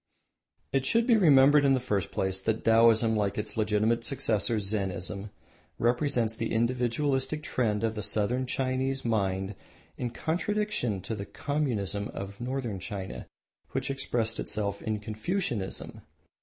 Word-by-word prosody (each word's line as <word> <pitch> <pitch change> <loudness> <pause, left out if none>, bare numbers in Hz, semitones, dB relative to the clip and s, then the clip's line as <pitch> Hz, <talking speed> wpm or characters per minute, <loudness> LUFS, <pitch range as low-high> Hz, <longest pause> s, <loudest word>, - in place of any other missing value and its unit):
It 135 -1 +2
should 230 0 +3
be 235 -2 +5
remembered 145 -6 +6
in 135 -1 +5
the - - +1
first 105 -6 -1
place 95 0 -2
that 110 +2 -1
Taoism, 115 0 +5
like 100 -2 0
its 105 - -4
legitimate 110 +2 +1
successor 115 -4 +1
Zennism, 100 -1 -2 0.5
represents 120 -2 +1
the 115 - -3
individualistic 130 +5 0
trend 110 -6 0
of 110 -1 +1
the 105 - -4
Southern 120 +5 0
Chinese 130 +1 -1
mind 95 -3 0 0.4
in 125 - -2
contra 165 - -2
distinction 210 - -1
to 110 - -5
the 100 -2 -5
communism 110 -9 -1
of 100 +3 -7
Northern 125 -5 -3
China 95 +1 -6 0.5
which - - -1
expressed 120 -4 -1
itself 100 -1 -2
in 110 -1 -2
Confucianism. 110 - -3
115 Hz, 140 wpm, -29 LUFS, 105-130 Hz, 0.5 s, remembered